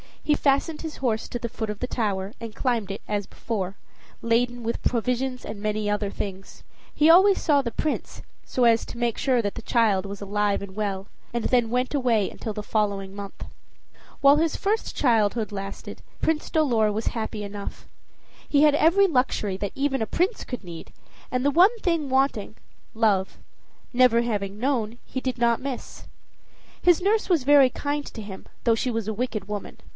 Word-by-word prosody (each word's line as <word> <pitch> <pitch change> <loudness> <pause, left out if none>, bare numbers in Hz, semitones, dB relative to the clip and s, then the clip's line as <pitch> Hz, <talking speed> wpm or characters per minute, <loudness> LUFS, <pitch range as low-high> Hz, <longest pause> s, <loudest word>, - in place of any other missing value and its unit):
He 300 - +3
fastened 285 +3 +1
his 320 -2 -6
horse 225 -4 -1
to - - -4
the 235 0 -4
foot 220 -1 -4
of 210 - -4
the 250 - -2
tower, 205 -4 -2
and 230 -2 -7
climbed 235 -6 0
it, 195 - -5
as 205 -1 -1
before, 195 -5 -4 0.5
laden 240 +1 +1
with 230 +1 -2
provisions 250 +2 -1
and 205 -1 -7
many 210 0 -1
other 205 -1 0
things. 195 -1 -7 0.3
He 305 +2 +5
always 380 +4 +7
saw 290 -3 +3
the 245 - -3
Prince, 300 +6 -3 0.2
so 255 - 0
as 230 -1 +4
to - - -9
make 235 -1 0
sure 255 -3 +2
that 205 -2 -3
the - - -6
child 215 -5 +2
was 200 0 -7
alive 205 0 0
and 195 -1 -8
well, 200 -2 -2 0.3
and 235 -1 -2
then 240 -3 +2
went 250 +3 0
away 240 -8 +2
until 220 - -6
the 210 0 -5
following 200 -3 -1
month. 200 -1 -8 0.8
While 280 +1 +7
his 320 0 +1
first 430 +3 -1
childhood 225 -3 +2
lasted 195 -1 -7 0.2
Prince 320 -1 0
Dolor 235 -9 +2
was 220 +2 -3
happy 220 -2 -3
enough. 200 0 -7 0.6
He 285 - +3
had 300 -1 +6
every 350 +6 +5
luxury 250 - 0
that 200 0 -4
even 270 -1 0
a 220 - 0
prince 380 +6 0
could 250 -4 -6
need, 170 -2 -9 0.4
and 250 0 -1
the 285 - +4
one 375 - +5
thing 335 -7 0
wanting, 265 -6 +1 0.4
love, 205 -4 +1 0.5
never 245 -2 +5
having 205 -4 -2
known, 240 -3 -1
he 260 - -4
did 255 -1 -3
not 235 -1 +2
miss. 265 -2 -6 0.8
His 350 0 +4
nurse 420 +3 +2
was 335 -7 +3
very 280 -1 +6
kind 290 +3 -3
to 225 - -8
him 200 -2 -9 0.2
though 230 -2 +4
she 250 +3 -1
was 225 -3 -2
a 220 - -1
wicked 215 -3 -3
woman. 210 -1 -6
235 Hz, 185 wpm, -25 LUFS, 210-275 Hz, 0.8 s, always